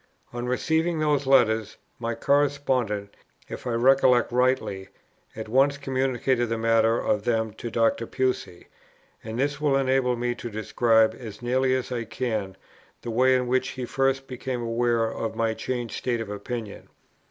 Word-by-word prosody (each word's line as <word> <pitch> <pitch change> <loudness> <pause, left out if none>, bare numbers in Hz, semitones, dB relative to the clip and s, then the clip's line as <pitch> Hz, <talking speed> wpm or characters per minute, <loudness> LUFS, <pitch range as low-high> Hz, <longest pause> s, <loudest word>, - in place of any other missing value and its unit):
On 120 0 -4
receiving 160 +6 0
these 145 -3 +1
letters, 110 -5 +3 0.2
my 115 0 -2
correspondent, 130 -7 0 0.3
if - - -7
I 120 - -1
recollect 125 0 +4
rightly, 125 -6 0 0.5
at 110 0 -6
once 135 +5 +3
communicated 130 -3 0
the 115 - -1
matter 115 0 +3
of 105 -1 0
them 110 -2 0
to 120 - -4
Dr. 115 0 +1
Pusey, 130 -9 -2 0.6
and 110 +1 -6
this 140 +2 -1
will 145 -2 +3
enable 130 -2 +1
me 120 0 -1
to 120 - -7
describe, 110 +1 +2
as 110 -2 -9
nearly 130 +1 +2
as 130 0 -3
I 120 -2 -2
can, 110 -6 -3 0.5
the 120 - -4
way 130 +3 +4
in 125 0 +1
which 130 +1 +1
he 125 - -3
first 135 +1 0
became 125 -1 -4
aware 115 0 +1
of 110 0 -4
my 115 -1 0
changed 120 0 -4
state 120 -2 -2
of 110 -2 -5
opinion. 105 +1 -6
120 Hz, 160 wpm, -25 LUFS, 115-130 Hz, 0.6 s, recollect